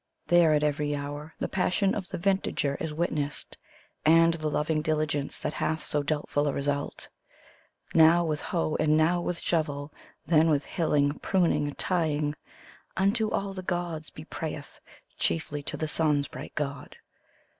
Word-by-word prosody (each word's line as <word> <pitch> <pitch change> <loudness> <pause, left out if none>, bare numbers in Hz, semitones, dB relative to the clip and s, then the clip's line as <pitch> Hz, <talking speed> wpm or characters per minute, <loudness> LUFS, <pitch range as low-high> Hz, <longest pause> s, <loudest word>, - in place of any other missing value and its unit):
There 175 -2 +6
at 150 0 +2
every 145 0 0
hour 145 +2 -6
the - - -2
passion 190 +1 +1
of 195 -3 -4
the 190 - -4
vintagier 180 -6 0
is 160 - -3
witnessed. 150 -2 -2 0.5
And 165 +2 +6
the 155 -2 -3
loving 155 +1 0
diligence, 150 -2 -1
that - - -3
hath 160 0 -1
so 150 - -1
doubtful 145 0 0
a 140 - 0
result. 145 0 -2 0.9
Now 165 +1 +6
with 155 -2 -1
hoe 165 -3 -1
and 155 0 +3
now 170 +3 +3
with 175 0 -2
shovel, 145 -3 -1 0.3
then 160 +1 +4
with 145 -2 +2
hilling, 150 -4 +1
pruning, 150 -6 +1
tying. 155 -5 0 0.6
Unto 210 +3 +2
lUl 195 -1 -2
the 185 - -5
Gods 175 -4 -3
be 150 - -11
prayeth, 155 -3 -6 0.4
chiefly 115 - -1
to - - -4
the 155 - -2
Sun's 150 -2 +2
bright - - -9
god. 140 -3 -4
155 Hz, 155 wpm, -28 LUFS, 145-170 Hz, 0.9 s, There